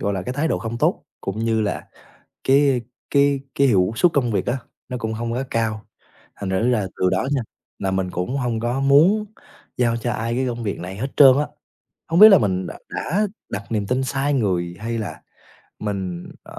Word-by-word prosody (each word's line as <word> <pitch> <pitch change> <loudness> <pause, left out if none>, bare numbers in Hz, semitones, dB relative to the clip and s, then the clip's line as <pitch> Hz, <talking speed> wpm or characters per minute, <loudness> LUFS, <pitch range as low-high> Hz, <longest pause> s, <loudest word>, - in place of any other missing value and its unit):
gọi 100 - 0
là, 95 - -3
cái 125 - -4
thái 145 +5 0
độ - - 0
không 115 0 -5
tốt - - +1 0.2
cũng 95 +2 -4
như 115 0 +1
là 105 -1 -2 0.6
cái 135 -2 +4 0.3
cái 140 0 +3 0.2
cái 140 - +4
hiệu 95 -5 +3
suất 175 +6 +4
công 125 -5 +1
việc 100 - 0
á 120 - 0 0.3
nó 125 - -3
cũng 110 -1 -3
hông 115 +1 -3
có 130 +3 -1
cao. 110 -2 -1 0.5
Thành 100 -2 -5
thử 110 +6 +1
ra 120 - +2
là 95 - -2
từ 95 - +2
đó 95 +8 0
nha 140 - +1 0.4
là 95 -1 -1
mình 95 -1 -1
cũng 90 +10 -2
hông 120 -4 -1
có 120 +3 -1
muốn 155 +11 +4 0.5
giao 120 -2 +2
cho 120 +1 -2
ai 115 +2 -2
cái 130 +1 0
công 120 -1 -4
việc 100 - -3
này 95 +2 -7
hết 125 +6 -2
trơn 135 -2 +8
á. 150 - 0 0.6
Hông 165 +1 +1
biết 215 +1 +12
là 195 - +8
mình 95 -4 0
đ - - -5 0.2
đã 205 +6 -1 0.2
đặt 100 - -4
niềm 105 -3 -1
tin 130 +3 0
sai 135 +2 0
người 90 -8 0
hay 115 +2 -3
là 110 -2 -5 0.6
mình, 95 -4 -4
ờ - - -11
115 Hz, 220 wpm, -22 LUFS, 100-135 Hz, 0.6 s, biết